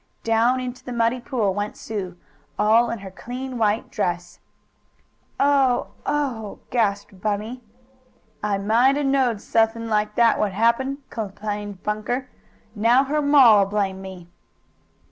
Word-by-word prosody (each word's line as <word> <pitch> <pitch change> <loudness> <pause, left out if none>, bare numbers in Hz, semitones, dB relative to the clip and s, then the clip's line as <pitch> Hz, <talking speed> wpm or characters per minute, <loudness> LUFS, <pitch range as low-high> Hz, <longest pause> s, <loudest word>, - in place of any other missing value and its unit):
Down 230 +3 +2
into 250 0 -6
the 250 - -6
muddy 235 +1 +1
pool 225 -6 -1
went 205 +1 -4
Sue, 190 -5 -5 0.4
all 225 +3 +4
in 230 - -3
her 190 - -8
clean 250 +5 -6
white 215 0 0
dress. 175 -4 -3 1.0
"Oh 275 -3 +2 0.2
Oh!" 260 -8 -2
gasped 200 -4 -1
Bunny. 215 +4 -3 0.8
"I 205 -2 0
might 235 +7 +3
a'knowed 270 -6 +1
suthin' 225 0 +1
like 210 -1 0
that 235 -1 +4
would 205 -3 0
happen," 260 +6 +1
complained 205 -2 -5
Bunker. 230 +5 -3 0.4
"Now 235 +5 +4
her 300 +2 -1
ma'll 260 -9 +6
blame 195 -2 -2
me!" 190 -3 -10
225 Hz, 125 wpm, -23 LUFS, 205-250 Hz, 1.0 s, ma'll